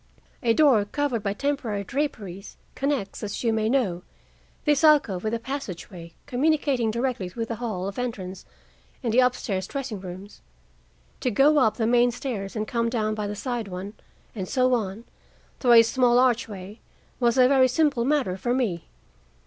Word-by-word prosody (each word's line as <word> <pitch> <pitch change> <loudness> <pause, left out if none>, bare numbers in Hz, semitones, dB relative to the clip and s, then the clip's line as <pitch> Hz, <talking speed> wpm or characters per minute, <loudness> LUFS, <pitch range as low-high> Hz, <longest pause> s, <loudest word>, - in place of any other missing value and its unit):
A 230 -1 +2
door, 275 -9 +5
covered 260 0 -1
by 200 -1 -1
temporary 245 -5 -2
draperies, 205 -7 -4 0.2
connects, 275 -8 -2
as 205 +2 -4
you 230 -2 +2
may 220 0 0
know, 215 -10 0 0.6
this 295 0 +2
alcove 285 - +4
with 220 +1 -1
a - - -3
passageway 185 -9 -7
communicating 275 -3 +1
directly 235 -5 -2
with 230 -1 -3
the 230 - -3
hall 205 -6 -3
of 200 +4 -5
entrance 195 -7 -5 0.6
and 230 -3 -1
the 255 - +6
up 250 0 +3
stairs 190 -6 -3
dressing 265 -7 -5
rooms. 185 +2 -10 0.8
To 255 - 0
go 285 +7 +4
up 220 -5 +2
the 225 - 0
main 240 +1 +4
stairs 235 -5 -5
and 215 0 -2
come 230 -1 0
down 215 -2 -1
by 210 -1 -3
the 205 - -4
side 240 -1 -3
one, 190 +2 -6 0.4
and 190 -4 -5
so 255 +3 +2
on, 215 -2 -2 0.6
through 245 -2 +4
a 230 -1 +9
small 245 +1 +3
archway, 220 -5 0 0.4
was 240 0 +2
a 250 -1 +7
very 260 -1 +5
simple 275 -2 +1
matter 260 -9 0
for 240 +6 -1
me. 210 -10 -2
230 Hz, 175 wpm, -25 LUFS, 200-255 Hz, 0.8 s, a